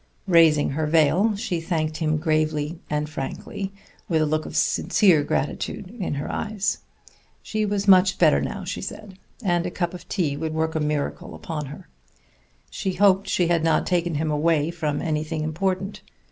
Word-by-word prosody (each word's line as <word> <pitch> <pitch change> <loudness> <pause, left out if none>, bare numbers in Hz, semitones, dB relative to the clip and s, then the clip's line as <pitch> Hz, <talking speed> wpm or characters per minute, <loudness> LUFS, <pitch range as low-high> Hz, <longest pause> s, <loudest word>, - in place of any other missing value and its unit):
Raising 165 -5 +5
her 155 +2 -1
veil, 165 +7 +3
she 180 -4 -2
thanked 160 -2 -1
him 155 -1 0
gravely 155 0 0
and 150 0 -1
frankly, 155 +6 -5 0.4
with 165 -3 +2
a - - +2
look 155 +1 -1
of - - -5
sincere 180 -8 +3
gratitude 180 +6 -3
in 175 -6 -2
her 140 - -4
eyes. 205 -2 -2 0.6
She 215 -1 -1
was 205 0 -1
much 185 -1 +6
better 155 -4 +4
now, 200 -2 -4
she 185 0 -4
said, 195 -1 -8 0.2
and 175 -3 +1
a - - -2
cup 175 -1 -2
of 180 - -10
tea 160 -8 0
would 160 +1 -3
work 160 0 0
a 160 - 0
miracle 150 -1 -2
upon 150 -3 -5
her. 150 +6 -10 0.8
She 190 -2 -2
hoped 195 +1 +3
she 175 -2 +1
had 170 -2 +2
not 165 - +2
taken 175 -2 0
him 155 +1 0
away 155 +1 +2
from 155 -4 -2
anything 155 -1 -2
important. 185 +5 -2
165 Hz, 175 wpm, -24 LUFS, 155-185 Hz, 0.8 s, much